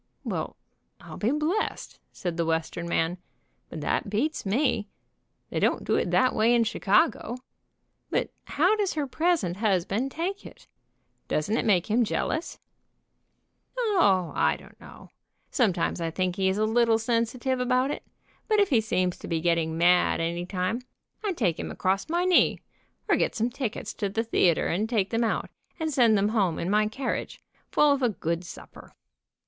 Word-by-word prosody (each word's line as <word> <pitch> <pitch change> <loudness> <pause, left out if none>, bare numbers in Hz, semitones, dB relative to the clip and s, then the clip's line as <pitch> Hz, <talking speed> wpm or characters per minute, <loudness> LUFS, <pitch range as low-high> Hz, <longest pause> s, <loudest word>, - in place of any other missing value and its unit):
"Well, - - -3 0.4
I'll - - -10
be 215 - 0
blessed," 305 - -2
said 175 -2 -4
the 170 - 0
Western 165 +1 -2
man, 170 +1 0 0.5
"but - - -7
that 230 - -1
beats 230 +4 -1
me. 230 -1 +1 0.6
They - - -1
don't - - +1
do - - +1
that 255 0 +2
way 230 +2 +3
in 235 - +4
Chicago. 225 +2 +1 0.7
But - - -1
how 430 - +2
does 410 -3 0
her 300 -2 -1
present 295 - 0
husband 205 +4 0
take 360 +8 -3
it? - - -13 0.6
Doesn't 155 +9 0
it - - 0
make 185 -5 +3
him 225 +3 +2
jealous 315 +8 -2 0.6
?" - - -42
"O, 340 - +2
I - - +2
don't - - -17
know. - - -14 0.4
Sometimes 180 - +1
I 165 - -1
think 180 +2 -1
he 190 0 +1
is 190 - -1
a 215 - +2
little 225 0 +3
sensitive 240 +3 -1
about 255 +2 +1
it, - - -4 0.5
but 430 -2 +3
if 405 - +3
he 235 -4 +4
seems 185 -4 0
to - - -8
be 165 -2 -1
getting 165 -1 0
mad 180 +1 +4
any 170 +1 -2
time 185 +5 -2 0.4
I 415 - 0
take 190 - 0
him - - -4
across 195 +8 -1
my 345 +2 +1
knee, 365 -1 +4 0.5
or - - +4
get - - 0
some 230 +2 0
tickets 245 -3 -4
to 200 - -2
the 225 +3 -1
theater 180 -7 +2
and 210 +6 -1
take 205 -5 0
them 230 0 +1
out, 225 - -1 0.3
and 315 -1 -2
send 235 -5 +5
them 200 +1 +2
home 195 -7 +1
in 175 - -2
my 210 0 +3
carriage, 255 +5 -4 0.3
full 295 -1 +4
of 280 -1 +1
a 245 - +3
good 170 -4 -3
supper. 170 - -12
220 Hz, 175 wpm, -27 LUFS, 180-260 Hz, 0.7 s, send